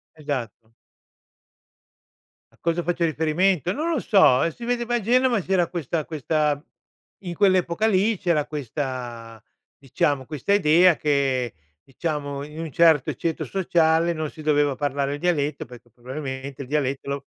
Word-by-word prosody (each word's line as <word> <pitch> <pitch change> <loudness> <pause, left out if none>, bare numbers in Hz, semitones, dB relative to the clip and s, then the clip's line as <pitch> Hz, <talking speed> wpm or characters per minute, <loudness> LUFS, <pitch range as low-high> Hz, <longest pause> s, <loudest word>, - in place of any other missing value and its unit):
Esatto. 120 -7 -5 1.8
A - - -27
cosa 170 +1 0
faccio 175 0 -1
riferimento? 160 +2 +1
Non 315 +8 -2
lo 315 - 0
so, 190 - +5
e 165 - +1
si 235 +8 -10
vedeva 240 0 -1
a - - -1
Genova 245 +1 +2
c’era 180 -2 +1
questa 165 -2 -3
questa 150 -1 -1 0.6
in 175 -2 -5
quell’epoca 185 0 +2
lì 210 0 +2
c’era 170 -6 +1
questa 125 -5 -5 0.4
diciamo, 135 0 -1
questa 155 +6 -2
idea 175 -1 +5
che 135 - 0 0.3
diciamo, 145 -1 -4
in 150 +2 -10
un 165 -3 -5
certo 160 -4 +4
ceto 165 -2 -3
sociale 170 -3 +2
non 155 -2 -4
si 155 - -11
doveva 145 -2 +2
parlare 140 0 -1
il 145 - -7
dialetto, 150 -5 0
perché 120 0 -15
probabilmente 130 +2 -7
il - - -8
dialetto 140 -2 -1
lo 140 0 -3
155 Hz, 145 wpm, -23 LUFS, 140-175 Hz, 1.8 s, so